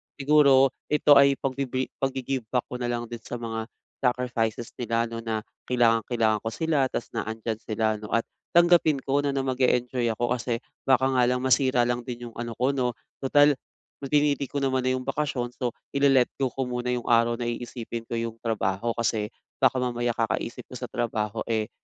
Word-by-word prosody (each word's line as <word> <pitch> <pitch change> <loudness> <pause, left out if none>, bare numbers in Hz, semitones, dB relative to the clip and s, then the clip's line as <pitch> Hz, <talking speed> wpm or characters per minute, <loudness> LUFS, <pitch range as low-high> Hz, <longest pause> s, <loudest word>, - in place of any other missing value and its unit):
siguro 140 -2 +5 0.2
ito 150 -1 +6
ay 140 0 +5
pagbibi 130 -1 -2
pag-gi-give 130 -2 -2
back 125 +2 0
ko 125 - -4
na 120 - -2
lang 120 0 -2
din 120 - -5
sa 115 - -7
mga 115 -1 -4 0.3
sacrifices 120 -3 -1
nila, 115 -1 0
'no, 115 - -4
na 110 -2 -3 0.2
kailangang-kailangan 115 -2 +2
ko 110 - -6
sila 145 +2 +1
tapos 120 - -5
na - - -3
andiyan 110 0 -3
sila, 110 0 -2
'no, 105 - -8
at 115 - +2 0.3
tanggapin 170 -3 +5
ko 140 +1 +2
'no 145 - 0
na 135 - 0
mag-e-enjoy 125 -1 +1
ako 120 0 +1
kasi 120 -1 -2 0.3
baka 130 0 +4
nga 125 -1 +4
lang 125 0 0
masira 130 -1 +3
lang 120 0 0
din 120 0 -7
yung - - -25
ano 120 -2 -5
ko, 130 +3 +2
'no? 125 -3 -1 0.2
Total 145 +2 +5 0.6
pinili 145 -1 +2
ko - - -4
naman 135 -2 +1
na 130 0 +1
'yong 130 - -7
bakasyon, 135 -5 -2
so, 125 -2 -3 0.2
i-le-let 140 -3 +4
go 130 - +2
ko 135 +2 -3
muna 125 0 -3
'yong 125 -1 -1
araw 115 0 +3
na 120 - -3
iisipin 120 0 -4
ko 115 - -2
'yong 115 0 -4
trabaho. 110 0 -1
Kasi 110 -2 0 0.3
baka - - +4
mamaya, 120 -1 -1
kakaisip 115 -1 -2
ko - - -15
sa - - -4
trabaho, 110 -3 -2
eh, 110 -2 -1
125 Hz, 190 wpm, -26 LUFS, 115-135 Hz, 0.6 s, ito